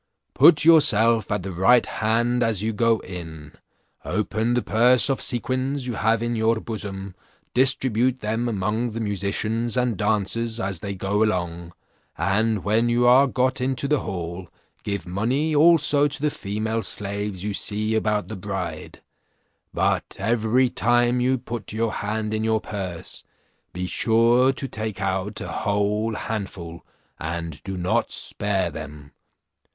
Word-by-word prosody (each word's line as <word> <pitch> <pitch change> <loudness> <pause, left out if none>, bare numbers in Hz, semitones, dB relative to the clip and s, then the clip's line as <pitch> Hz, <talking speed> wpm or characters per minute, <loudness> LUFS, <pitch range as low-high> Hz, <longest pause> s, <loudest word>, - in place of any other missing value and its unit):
Put 155 -3 +6
yourself 115 -9 +5
at 105 -3 -1
the 95 - -5
right 110 +8 +4
hand 120 +3 0
as 110 -4 +1
you 110 +1 -1
go 115 +1 +2
in, 80 -5 -9 0.5
open 115 +3 -1
the 125 - 0
purse 125 +4 +4
of 135 - -2
sequins 130 +2 -2
you 125 - -3
have 115 +1 +1
in 120 0 -1
your 110 0 +1
bosom, 100 -4 -3 0.4
distribute 130 -1 +2
them 110 +3 -1
among 110 +3 -1
the 115 - -4
musicians 105 +3 -2
and 125 -2 +1
dancers 110 +3 0
as 95 -5 -2
they 100 +2 -5
go 100 +3 -1
along; 85 -4 -2 0.4
and 110 +1 0
when 110 +4 +2
you 120 +1 +2
are 130 +3 +6
got 130 0 0
into 130 +2 -1
the 150 0 +2
hall, 85 -1 -6 0.3
give 100 -1 -3
money 125 - 0
also 150 -2 +5
to 145 - -4
the 150 +1 0
female 110 +1 -3
slaves 100 -2 -4
you 105 0 -2
see 105 +2 -2
about 105 -3 0
the 110 - -6
bride; 95 -5 -6 0.7
but - - -1
every 115 +4 +2
time 120 +1 +2
you 130 +1 +2
put 120 -2 -7
your 115 0 0
hand 105 +1 -3
in 110 0 -1
your 110 0 +1
purse, 95 -6 -7 0.5
be 90 +1 -4
sure 115 +6 +3
to 135 +1 -5
take 110 -4 -5
out 95 +1 -2
a - - -5
whole 105 +2 -1
handful, 95 -7 -5 0.4
and 80 -1 -5
do 95 -1 -6
not 100 +7 0
spare 95 -4 -2
them. 75 -2 -9
110 Hz, 150 wpm, -23 LUFS, 100-120 Hz, 0.7 s, Put